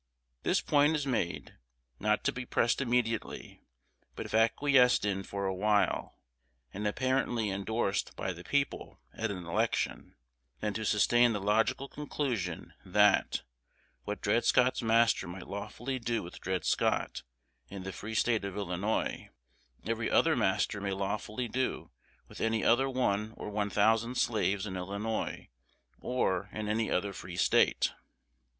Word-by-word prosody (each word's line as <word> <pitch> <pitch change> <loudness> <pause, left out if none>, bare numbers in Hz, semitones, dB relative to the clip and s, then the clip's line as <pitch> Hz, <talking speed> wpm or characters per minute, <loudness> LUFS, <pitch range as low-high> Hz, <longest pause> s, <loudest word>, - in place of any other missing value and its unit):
This - - +2
point 145 +2 +3
is 145 -2 -1
made, 115 -10 -2 0.4
not 105 +1 +1
to - - +2
be 125 - -5
pressed 120 +1 +1
immediately; 120 -3 -1 0.5
but - - -5
if - - -8
acquiesced 125 +2 +4
in 95 -2 0
for 100 +1 -4
a 95 - 0
while, 105 +2 +1 0.6
and 105 +2 -2
apparently 125 -1 0
indorsed 100 +1 -1
by 95 - -3
the 85 +1 -11
people 145 +5 -2
at 115 0 -2
an 90 -3 -5
election, 85 - -1 0.4
then 105 -1 -2
to 110 0 -3
sustain 120 +3 +4
the 105 - -1
logical 110 +7 +1
conclusion, 130 - -3
that, - - +3 0.6
what 105 - -5
Dred 115 +4 +2
Scott's 125 +1 +3
master 115 -3 +3
might 90 +1 -8
lawfully 110 +6 -4
do 115 -1 -1
with 85 - -10
Dred 95 -2 -2
Scott - - 0 0.5
in 95 -1 -7
the 95 0 -5
free 110 +2 -6
State 115 -2 +2
of 100 0 -5
Illinois, 100 +2 -2 0.6
every - - -1
other - - +4
master 100 - +1
may 100 -1 -1
lawfully 105 +5 -3
do 130 +3 -2 0.4
with - - -10
any 115 -1 +1
other 135 +3 +4
one 110 -4 0
or 105 - -6
one 105 0 -1
thousand 110 +4 +2
slaves 105 -4 +1
in 95 -3 -5
Illinois, 100 +4 -3 0.5
or 100 -6 -1
in 110 -1 -4
any 110 +1 0
other 100 +2 0
Free 90 -1 -8
State. 85 - +3
110 Hz, 145 wpm, -31 LUFS, 100-120 Hz, 0.6 s, acquiesced